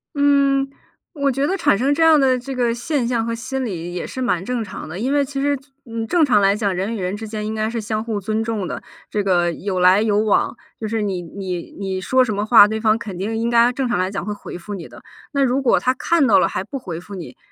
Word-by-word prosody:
嗯， 280 Hz, -1 st, +3 dB, 0.4 s
我 280 Hz, -3 st, +1 dB
觉 275 Hz, +2 st, 0 dB
得 380 Hz, -, 0 dB
产 335 Hz, -, +2 dB
生 270 Hz, +5 st, +2 dB
这 325 Hz, -, +2 dB
样 320 Hz, -2 st, +6 dB
的 260 Hz, -2 st, +3 dB
这 260 Hz, +2 st, -6 dB
个 245 Hz, -2 st, +1 dB
现 250 Hz, 0 st, -1 dB
象 235 Hz, -2 st, 0 dB
和 230 Hz, -, -2 dB
心 260 Hz, +3 st, -3 dB
理 175 Hz, -5 st, -5 dB
也 180 Hz, -, -4 dB
是 260 Hz, -, -6 dB
蛮 230 Hz, -8 st, 0 dB
正 245 Hz, +3 st, -2 dB
常 195 Hz, -5 st, -8 dB
的， 175 Hz, +5 st, -6 dB
因 260 Hz, +5 st, 0 dB
为 290 Hz, -1 st, +3 dB
其 275 Hz, 0 st, -5 dB
实， 285 Hz, +1 st, +1 dB, 0.3 s
嗯， 230 Hz, -1 st, -4 dB
正 330 Hz, +6 st, +3 dB
常 225 Hz, -7 st, +4 dB
来 195 Hz, 0 st, +4 dB
讲， 200 Hz, -3 st, -1 dB
人 195 Hz, +5 st, -2 dB
与 -, -, -5 dB
人 180 Hz, +2 st, -2 dB
之 220 Hz, +2 st, -6 dB
间 215 Hz, 0 st, -4 dB
应 220 Hz, -, -3 dB
该 215 Hz, 0 st, -1 dB
是 230 Hz, 0 st, -3 dB
相 215 Hz, 0 st, -2 dB
互 225 Hz, -3 st, -2 dB
尊 215 Hz, +2 st, -1 dB
重 220 Hz, -4 st, -2 dB
的， -, -, -6 dB, 0.3 s
这 210 Hz, -, -1 dB
个 175 Hz, -3 st, +2 dB
有 185 Hz, +1 st, -3 dB
来 185 Hz, +3 st, +5 dB
有 210 Hz, -2 st, +2 dB
往， 215 Hz, +2 st, +1 dB, 0.2 s
就 220 Hz, -, -3 dB
是 225 Hz, 0 st, -1 dB
你 195 Hz, -3 st, -2 dB
你 180 Hz, 0 st, -6 dB
你 190 Hz, -1 st, -3 dB
说 255 Hz, +6 st, +3 dB
什 215 Hz, -4 st, -2 dB
么 205 Hz, +1 st, -1 dB
话， 220 Hz, -2 st, +8 dB
对 220 Hz, +1 st, -2 dB
方 215 Hz, -1 st, +3 dB
肯 200 Hz, -5 st, -7 dB
定 215 Hz, +4 st, -2 dB
应 230 Hz, +1 st, 0 dB
该 235 Hz, +1 st, +5 dB
正 255 Hz, 0 st, -2 dB
常 240 Hz, -, 0 dB
来 185 Hz, +1 st, 0 dB
讲 195 Hz, -3 st, -4 dB
会 210 Hz, -, -2 dB
回 205 Hz, -, -8 dB
复 205 Hz, +4 st, -8 dB
你 180 Hz, -5 st, -6 dB
的。 -, -, -13 dB, 0.3 s
那 280 Hz, -, 0 dB
如 265 Hz, +1 st, +1 dB
果 260 Hz, -, +3 dB
他 255 Hz, -, +1 dB
看 300 Hz, +2 st, +2 dB
到 210 Hz, -, +6 dB
了 -, -, +3 dB
还 -, -, -2 dB
不 245 Hz, +6 st, -5 dB
回 175 Hz, -10 st, -6 dB
复 200 Hz, +3 st, -10 dB
你， 155 Hz, -9 st, -9 dB
220 Hz, 295 characters per minute, -20 LUFS, 195-255 Hz, 0.4 s, 话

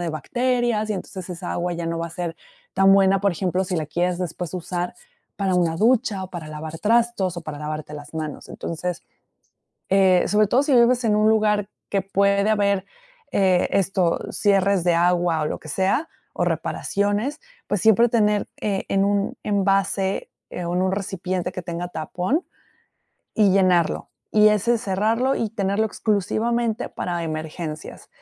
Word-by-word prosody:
de 175 Hz, -, -2 dB
bacterias 240 Hz, -, 0 dB
y -, -, +1 dB
entonces 185 Hz, -1 st, -7 dB
esa 175 Hz, 0 st, -5 dB
agua 175 Hz, 0 st, -2 dB
ya 170 Hz, 0 st, -4 dB
no 165 Hz, 0 st, -2 dB
va 170 Hz, -, -2 dB
a -, -, -15 dB
ser 170 Hz, 0 st, -4 dB, 0.4 s
tan 195 Hz, 0 st, +5 dB
buena, 195 Hz, 0 st, +4 dB
por 200 Hz, -, +2 dB
ejemplo, 185 Hz, +1 st, -1 dB
si 180 Hz, -1 st, -2 dB
la 155 Hz, -2 st, -2 dB
quieres 175 Hz, +3 st, -1 dB
después 180 Hz, -1 st, -4 dB
usar 180 Hz, 0 st, -3 dB, 0.4 s
para 195 Hz, -2 st, 0 dB
una 170 Hz, -2 st, +1 dB
ducha 220 Hz, -2 st, +2 dB
o 185 Hz, -, -11 dB
para 170 Hz, -4 st, -7 dB
lavar 155 Hz, +1 st, -7 dB
trastos 225 Hz, -4 st, +1 dB
o -, -, -4 dB
para 155 Hz, -2 st, -6 dB
lavarte 150 Hz, 0 st, -5 dB
las 145 Hz, +1 st, -10 dB
manos. 155 Hz, -2 st, -5 dB
Entonces, 175 Hz, +1 st, -5 dB, 0.9 s
eh, 190 Hz, -2 st, +4 dB
sobre 210 Hz, 0 st, +3 dB
todo 255 Hz, +7 st, +3 dB
si 285 Hz, -, +1 dB
vives 245 Hz, 0 st, +4 dB
en 210 Hz, -2 st, +2 dB
un 215 Hz, 0 st, +4 dB
lugar 210 Hz, -2 st, +2 dB, 0.2 s
que 195 Hz, -, +1 dB
puede 200 Hz, +1 st, +2 dB
haber, 200 Hz, -2 st, +1 dB, 0.5 s
eh, 185 Hz, -2 st, +3 dB
esto, 190 Hz, -3 st, +1 dB
cierres 195 Hz, -3 st, +2 dB
de 175 Hz, -1 st, +4 dB
agua 175 Hz, -1 st, +2 dB
o -, -, 0 dB
lo -, -, -4 dB
que -, -, -13 dB
sea 190 Hz, -, 0 dB, 0.2 s
o -, -, -1 dB
reparaciones. 205 Hz, +8 st, -1 dB, 0.3 s
Pues, 205 Hz, -, -1 dB
siempre 220 Hz, +2 st, +5 dB
tener, 210 Hz, -3 st, +2 dB
eh, 200 Hz, -2 st, -1 dB
en 195 Hz, 0 st, +2 dB
un 200 Hz, 0 st, 0 dB
envase 195 Hz, -1 st, 0 dB, 0.2 s
o 175 Hz, -1 st, -4 dB
en 180 Hz, -, +1 dB
un 190 Hz, 0 st, +1 dB
recipiente 185 Hz, -2 st, -3 dB
que 185 Hz, -, -5 dB
tenga 175 Hz, 0 st, -5 dB
tapón. 180 Hz, -, -2 dB, 0.9 s
Y 205 Hz, -2 st, +5 dB
llenarlo. 185 Hz, -3 st, +2 dB, 0.2 s
Y 215 Hz, 0 st, +6 dB
ese 220 Hz, +3 st, +2 dB
cerrarlo 225 Hz, +6 st, +1 dB
y 225 Hz, -, -2 dB
tenerlo 200 Hz, 0 st, 0 dB
exclusivamente 220 Hz, +2 st, -1 dB
para 175 Hz, -1 st, -3 dB
emergencias. 155 Hz, 0 st, -6 dB
190 Hz, 170 wpm, -23 LUFS, 175-210 Hz, 0.9 s, Y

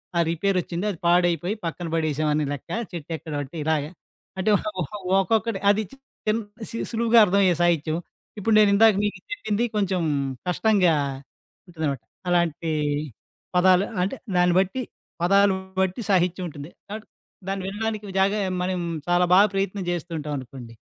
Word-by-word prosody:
ఆహ్, 170 Hz, -1 st, +3 dB
రిపేర్ 190 Hz, +3 st, 0 dB
వచ్చింది 175 Hz, +4 st, -4 dB
అది 175 Hz, -, -9 dB
పాడైపోయి 175 Hz, +2 st, +2 dB
పక్కన 170 Hz, +1 st, -4 dB
పడేసాం 155 Hz, -1 st, 0 dB
అని 150 Hz, -, +1 dB
లెక్క. 140 Hz, -, -9 dB, 0.2 s
చెట్టెక్కడమంటే 155 Hz, -2 st, -5 dB
ఇలాగ 155 Hz, -2 st, +1 dB, 0.6 s
అంటే 195 Hz, +3 st, +1 dB
ఓహ్ -, -, -6 dB
ఓహ్ 210 Hz, -, -5 dB, 0.3 s
ఒక్కొక్కటి 220 Hz, +1 st, 0 dB
అది 215 Hz, +1 st, 0 dB, 0.4 s
చిన్ 215 Hz, +2 st, +2 dB, 0.5 s
సులువుగా 230 Hz, 0 st, +4 dB
అర్థమయ్యే 190 Hz, -2 st, +3 dB
సాహిత్యం. 165 Hz, -2 st, +1 dB, 0.4 s
ఇప్పుడు 220 Hz, +2 st, +1 dB
నేనిందాక 210 Hz, +1 st, +6 dB
మీకు 210 Hz, -, -2 dB
చెప్పింది 235 Hz, -, -1 dB
కొంచెం 195 Hz, -3 st, +1 dB, 0.5 s
కష్టంగా 185 Hz, -1 st, +3 dB, 0.7 s
ఉంటుందనమాట 155 Hz, -7 st, -3 dB, 0.3 s
అలాంటి 170 Hz, -2 st, +1 dB, 0.8 s
పదాలు. 185 Hz, +2 st, +5 dB, 0.2 s
అంటే 195 Hz, +8 st, -2 dB, 0.2 s
దాన్ని 180 Hz, 0 st, +4 dB
బట్టి 195 Hz, +7 st, 0 dB, 0.4 s
పదాలు 195 Hz, +1 st, +4 dB, 0.3 s
బట్టి 190 Hz, +5 st, -1 dB
సాహిత్యం 180 Hz, 0 st, +2 dB
ఉంటుంది 145 Hz, +1 st, -9 dB, 0.2 s
కాబట్టి 215 Hz, +1 st, -7 dB, 0.4 s
దాన్ని 195 Hz, -1 st, -2 dB
వినడానికి 210 Hz, 0 st, -4 dB
జాగ 195 Hz, +1 st, +3 dB, 0.3 s
మనం 185 Hz, 0 st, -1 dB, 0.3 s
చాలా 175 Hz, 0 st, +4 dB
బాగా 205 Hz, +2 st, +7 dB
ప్రయత్నం 195 Hz, 0 st, -1 dB
చేస్తూ 175 Hz, 0 st, -4 dB
ఉంటాం 150 Hz, 0 st, -5 dB
అనుకోండి. 125 Hz, -2 st, -10 dB
180 Hz, 135 wpm, -24 LUFS, 165-205 Hz, 0.8 s, బాగా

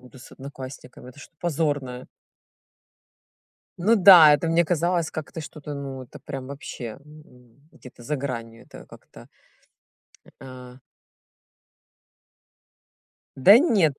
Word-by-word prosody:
буду 125 Hz, +1 st, -17 dB
с 125 Hz, -, -15 dB
одноклассниками, 130 Hz, -2 st, -11 dB
это 130 Hz, -, -19 dB
что-то 155 Hz, -, -15 dB
позорное". 145 Hz, -6 st, -3 dB, 1.7 s
Ну 205 Hz, +6 st, +3 dB
да, 180 Hz, -6 st, +8 dB
это 165 Hz, +3 st, -4 dB
мне 165 Hz, +1 st, +2 dB
казалось 170 Hz, 0 st, -1 dB
как-то 155 Hz, +1 st, -7 dB
что-то, 150 Hz, -1 st, -9 dB
ну, 135 Hz, -2 st, -7 dB
это 120 Hz, -, -14 dB
прям 135 Hz, -1 st, -8 dB
вообще 130 Hz, -4 st, -8 dB, 0.7 s
где-то 125 Hz, -1 st, -16 dB
за 150 Hz, +5 st, -3 dB
гранью, 115 Hz, -4 st, -7 dB
это -, -, -14 dB
как-то, -, -, -17 dB, 1.1 s
а. 125 Hz, -1 st, -12 dB, 2.6 s
Да 195 Hz, -, +7 dB
нет, 195 Hz, -, +1 dB
140 Hz, 105 wpm, -23 LUFS, 130-165 Hz, 2.6 s, да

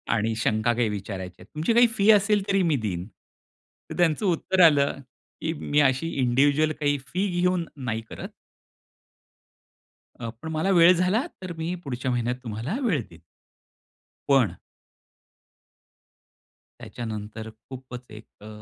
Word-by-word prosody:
आणि 110 Hz, 0 st, 0 dB
शंका 110 Hz, +1 st, +1 dB
काही 120 Hz, -1 st, +1 dB
विचारायची 95 Hz, -3 st, -6 dB
आहे. -, -, -12 dB
तुमची 160 Hz, +9 st, +1 dB
काही 240 Hz, +1 st, +6 dB
फी 200 Hz, +2 st, +3 dB
असेल 205 Hz, -1 st, +3 dB
तरी 195 Hz, -1 st, +2 dB
मी 165 Hz, -4 st, +2 dB
देईन, 90 Hz, -4 st, -3 dB, 0.8 s
तर -, -, -7 dB
त्यांचं 175 Hz, +3 st, +2 dB
उत्तर 185 Hz, +1 st, +1 dB
आलं, 140 Hz, -3 st, +3 dB, 0.4 s
की 160 Hz, -, -1 dB
मी 145 Hz, -2 st, 0 dB
अशी 135 Hz, +5 st, -1 dB
इंडिव्हिज्युअल 145 Hz, +5 st, +3 dB
काही 145 Hz, -1 st, +1 dB
फी 185 Hz, +10 st, -1 dB
घेऊन 180 Hz, -1 st, +1 dB
नाही 115 Hz, -5 st, -3 dB
करत. -, -, -7 dB, 1.9 s
अ, 115 Hz, -, -6 dB
पण 160 Hz, -, -6 dB
मला 160 Hz, +4 st, 0 dB
वेळ 170 Hz, -1 st, +7 dB
झाला, 185 Hz, +8 st, +1 dB, 0.2 s
तर 185 Hz, -2 st, -5 dB
मी 165 Hz, +2 st, -2 dB
पुढच्या 130 Hz, -1 st, -3 dB
महिन्यात 120 Hz, 0 st, 0 dB
तुम्हाला 115 Hz, -, -4 dB
वेळ 180 Hz, -, +1 dB
देईन. 85 Hz, -, -15 dB, 1.1 s
पण 125 Hz, -11 st, +3 dB, 2.2 s
त्याच्यानंतर 110 Hz, -1 st, -6 dB, 0.2 s
खूपच 130 Hz, -2 st, -9 dB, 0.2 s
एक 115 Hz, -, -18 dB, 0.2 s
अ, -, -, -10 dB
140 Hz, 135 wpm, -25 LUFS, 115-175 Hz, 2.2 s, वेळ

